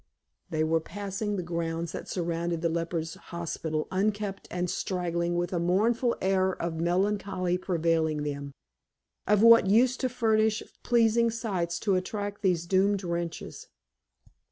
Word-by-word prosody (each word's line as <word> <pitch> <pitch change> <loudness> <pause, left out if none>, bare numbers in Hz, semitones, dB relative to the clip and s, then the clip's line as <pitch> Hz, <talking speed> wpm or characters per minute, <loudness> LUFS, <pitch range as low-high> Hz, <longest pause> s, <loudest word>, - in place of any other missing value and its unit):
They 155 -2 0
were 160 +1 +2
passing 205 +4 -4
the 185 - -2
grounds 170 -1 -3
that - - -7
surrounded 170 -1 -2
the 170 - +2
lepers' 165 0 -2 0.2
hospital, 160 -2 -3
unkempt 200 +1 -1
and 180 0 -2
straggling, 175 -1 -1
with 175 +1 -1
a 175 - +1
mournful 225 +8 +2
air 190 -1 +1
of 165 -1 -3
melancholy 185 +1 0
pervading 165 -4 0
them. 140 -1 -4 0.8
Of 210 +1 +4
what 230 -3 +8
use 240 +5 +4
to 255 - -1
furnish 220 -3 +2 0.2
pleasing 235 -1 +3
sights 195 -7 -2
to 200 - +1
attract 205 +2 -2
these 180 -4 +1
doomed 195 +2 +2
wretches? 170 -1 -4
185 Hz, 135 wpm, -28 LUFS, 170-205 Hz, 0.8 s, what